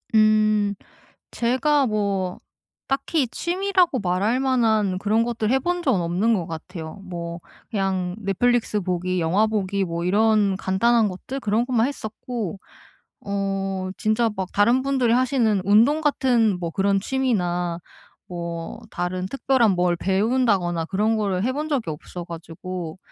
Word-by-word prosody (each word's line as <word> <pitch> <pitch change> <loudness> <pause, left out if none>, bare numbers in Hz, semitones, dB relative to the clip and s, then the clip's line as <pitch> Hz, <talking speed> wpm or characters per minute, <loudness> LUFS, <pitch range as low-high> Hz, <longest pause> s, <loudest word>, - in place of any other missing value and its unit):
음. 215 -1 +4 0.6
제가 265 +4 +2
뭐 200 -4 -1 0.5
딱히 275 +2 +1
취미라고 360 -2 +1
말할 200 +5 0
만한 220 -7 +2
그런 215 +3 +2
것들을 230 -2 -1
해본 350 +7 0
적은 260 - +2
없는 180 +7 +1
것 185 -6 0
같아요. 160 0 -7
뭐 170 -2 -6 0.3
그냥 190 -4 -1
넷플릭스 220 +2 +1
보기, 180 0 -1
영화 185 +7 +2
보기 200 -2 -1
뭐 170 -1 -3
이런 205 +1 +3
간단한 220 +5 +2
것들 205 +8 -6
그런 225 0 0
것만 245 -2 +2
했었고 220 - -5 0.7
어 195 -1 -2
진짜 220 +2 +1
막 190 -1 -3
다른 235 +6 +3
분들이 265 -4 +1
하시는 240 -5 +2
운동 230 +10 +4
같은 245 -9 +2
뭐 170 -2 -3
그런 195 +3 +1
취미나 180 -8 -1 0.5
뭐 170 -1 -6
다른 180 +1 -3
특별한 260 0 +2
뭘 180 -1 +2
배운다거나 195 -4 +1
그런 210 +5 +1
거를 195 -3 -1
해 255 - +1
본 300 +3 -3
적이 265 - -1
없어가지고 170 +2 -7
205 Hz, 270 characters per minute, -23 LUFS, 185-240 Hz, 0.7 s, 음